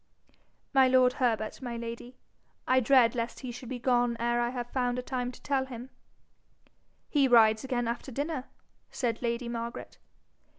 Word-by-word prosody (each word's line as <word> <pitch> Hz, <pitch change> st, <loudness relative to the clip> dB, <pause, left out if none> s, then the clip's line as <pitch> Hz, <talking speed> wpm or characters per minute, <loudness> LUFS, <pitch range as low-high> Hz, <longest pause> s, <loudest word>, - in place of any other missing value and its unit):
'My 265 Hz, -1 st, +6 dB
lord 255 Hz, -1 st, +4 dB
Herbert, 220 Hz, -2 st, 0 dB
my 240 Hz, -2 st, -4 dB
lady. 235 Hz, +2 st, -7 dB, 0.5 s
I 260 Hz, 0 st, +5 dB
dread 250 Hz, -2 st, +5 dB
lest 235 Hz, -1 st, -4 dB
he 255 Hz, -2 st, -5 dB
should 245 Hz, 0 st, -9 dB
be 255 Hz, -, -3 dB
gone 245 Hz, -1 st, +1 dB
ere 240 Hz, +1 st, +1 dB
I 240 Hz, -, 0 dB
have 245 Hz, -1 st, -5 dB
found 250 Hz, -1 st, 0 dB
a 250 Hz, -, -3 dB
time 250 Hz, -1 st, -3 dB
to -, -, -14 dB
tell 270 Hz, -2 st, 0 dB
him.' 250 Hz, 0 st, -9 dB, 1.2 s
'He 280 Hz, -3 st, +3 dB
rides 220 Hz, -3 st, +5 dB
again 245 Hz, -3 st, -1 dB
after 235 Hz, +3 st, -4 dB
dinner,' 285 Hz, +1 st, -3 dB, 0.4 s
said 235 Hz, -3 st, -2 dB
lady 235 Hz, 0 st, -2 dB
Margaret. 235 Hz, 0 st, -6 dB
245 Hz, 165 wpm, -29 LUFS, 235-260 Hz, 1.2 s, My